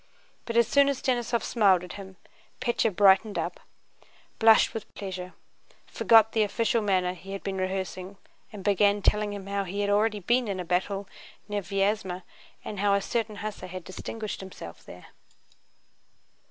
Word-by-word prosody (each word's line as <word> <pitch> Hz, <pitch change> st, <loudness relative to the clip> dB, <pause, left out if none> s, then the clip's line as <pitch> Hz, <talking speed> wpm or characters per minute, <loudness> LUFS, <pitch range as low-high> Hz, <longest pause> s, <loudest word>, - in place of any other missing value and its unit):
But 230 Hz, 0 st, -2 dB
as 235 Hz, -2 st, +5 dB
soon 280 Hz, +2 st, +4 dB
as 275 Hz, -, -1 dB
Denísov 240 Hz, -2 st, 0 dB
smiled 195 Hz, -6 st, +3 dB
at 180 Hz, -, -8 dB
him 190 Hz, -2 st, -10 dB, 0.4 s
Pétya 240 Hz, -2 st, +1 dB
brightened 200 Hz, +2 st, +4 dB
up, -, -, -3 dB, 0.8 s
blushed 225 Hz, -1 st, +6 dB
with 220 Hz, -2 st, -7 dB
pleasure, 185 Hz, -2 st, -6 dB, 0.5 s
forgot 225 Hz, -1 st, +5 dB
the 220 Hz, -, +1 dB
official 225 Hz, +2 st, +1 dB
manner 185 Hz, -3 st, +1 dB
he 190 Hz, +2 st, -10 dB
had 195 Hz, -, -6 dB
been 195 Hz, -1 st, -3 dB
rehearsing, 185 Hz, 0 st, -4 dB, 0.3 s
and 205 Hz, -3 st, -9 dB
began 205 Hz, 0 st, +3 dB
telling 210 Hz, 0 st, +2 dB
him 200 Hz, -2 st, -7 dB
how 200 Hz, 0 st, -2 dB
he 195 Hz, +2 st, -4 dB
had 205 Hz, 0 st, 0 dB
already 210 Hz, +1 st, +2 dB
been 240 Hz, +5 st, +1 dB
in 195 Hz, -2 st, -3 dB
a 180 Hz, -, -4 dB
battle 195 Hz, +3 st, -1 dB, 0.4 s
near 205 Hz, -1 st, -2 dB
Vyázma 195 Hz, -1 st, -1 dB, 0.4 s
and 205 Hz, -, -5 dB
how 200 Hz, 0 st, +3 dB
a -, -, +2 dB
certain 220 Hz, +1 st, -2 dB
hussar 205 Hz, -3 st, -5 dB
had 185 Hz, 0 st, -7 dB
distinguished 215 Hz, +4 st, -6 dB
himself 190 Hz, -1 st, -10 dB
there. -, -, -12 dB
200 Hz, 165 wpm, -27 LUFS, 190-220 Hz, 0.8 s, blushed